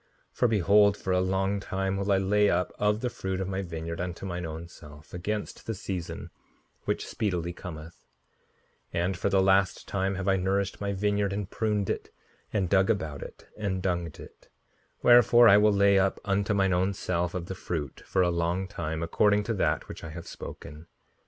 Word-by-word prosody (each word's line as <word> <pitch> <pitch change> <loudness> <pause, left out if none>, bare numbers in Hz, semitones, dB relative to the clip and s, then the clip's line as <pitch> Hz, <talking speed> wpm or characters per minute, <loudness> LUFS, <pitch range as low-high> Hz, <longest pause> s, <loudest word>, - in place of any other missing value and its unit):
5:76 - - -30
For 125 - +5
behold, 105 -1 +4
for 95 - -2
a 90 - +3
long 95 +2 0
time 95 0 -2
will 100 +1 -1
I 100 - +5
lay 105 +2 +3
up 90 +1 0
of 105 +1 +1
the 125 - 0
fruit 95 -1 -3
of 95 - -2
my 95 0 -2
vineyard 85 -2 -5
unto 90 +1 -5
mine 90 -2 -4
own 80 +2 -7
self 75 -3 -14
against 105 +4 -4
the 115 - -2
season, 90 -3 -5 0.5
which - - -1
speedily 90 -5 -2
cometh; 80 -2 -9 0.9
and 90 +3 0
for 95 - -1
the 95 -1 +3
last 95 0 +2
time 95 0 -1
have 95 +1 -4
I 95 0 +4
nourished 95 +2 -1
my 100 0 -1
vineyard, 100 0 0
and 100 -1 -3
pruned 105 -2 -1
it, - - -3 0.4
and 100 -4 0
dug 95 +2 +3
about 80 -10 -1
it, - - -10
and 100 -3 -2
dunged 85 -3 -2
it; - - -14 0.5
wherefore 120 0 +7
I 100 -1 +8
will 105 +1 +5
lay 100 -1 +4
up 95 0 +1
unto 100 +1 +1
mine 95 -1 +2
own 95 +2 +1
self 90 -1 -2
of 90 -2 -3
the 95 - -5
fruit, 80 -7 -5
for 95 - +1
a 90 - +2
long 85 +3 -1
time, 80 -2 -4
according 105 +5 +3
to 115 - -2
that 80 -6 0
which - - -9
I 80 - -6
have 85 +2 -8
spoken. 75 +3 -9
95 Hz, 195 wpm, -28 LUFS, 85-100 Hz, 0.9 s, I